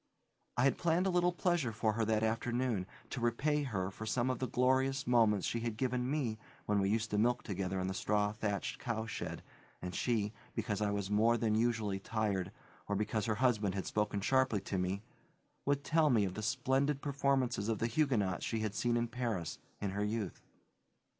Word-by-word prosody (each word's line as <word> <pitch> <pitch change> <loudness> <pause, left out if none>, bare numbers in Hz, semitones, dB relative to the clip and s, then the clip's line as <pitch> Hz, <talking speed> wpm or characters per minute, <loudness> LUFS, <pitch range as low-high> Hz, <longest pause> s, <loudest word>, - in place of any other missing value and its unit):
I 120 - +3
had 135 - +3
planned 170 +2 +2
a 190 - +2
little 175 0 +3
pleasure 175 -8 +1
for 110 0 0
her 115 +1 0
that 110 0 +1
afternoon, 115 -2 0 0.2
to 125 - -3
repay 140 +6 +1
her 100 -9 -2
for 110 +3 -7
some 120 +3 +1
of 130 - -3
the 130 - -1
glorious 130 +3 +2
moments 110 -5 +4
she 115 - -1
had 115 -2 -3
given 125 0 0
me 130 -7 -1 0.3
when 105 -1 +2
we 95 0 +2
used 110 +1 0
to 105 - +2
milk 120 +3 +2
together 95 -2 -2
in 95 - -1
the 95 - -1
straw 105 +1 +1
thatched 105 -2 -2
cowshed 115 -2 -4 0.4
and 90 0 -5
she, 110 0 0 0.2
because 105 -2 -1
I 105 - +2
was 100 -1 -2
more 115 +3 +4
than 110 -2 +1
usually 110 -3 +1
tired, 100 -3 -1 0.4
or 100 - 0
because 105 +1 -1
her 110 - +1
husband 105 -5 +2
had 95 - -2
spoken 105 -1 0
sharply 130 -2 +2
to 95 0 -2
me, 95 +3 -1 0.6
would 140 0 +2
tell 155 0 +3
me 110 -6 +4
of 95 - -3
the 110 - -5
splendid 135 +6 +1
performance 140 -3 +1
of 110 +2 0
the - - 0
Huguenots 115 - +1
she 110 -1 -1
had 110 -2 -1
seen 120 +1 +1
in 120 0 0
Paris, 115 -8 -3 0.2
in 100 -2 -2
her 100 +2 -1
youth. 105 -3 -2
115 Hz, 200 wpm, -34 LUFS, 105-125 Hz, 0.6 s, moments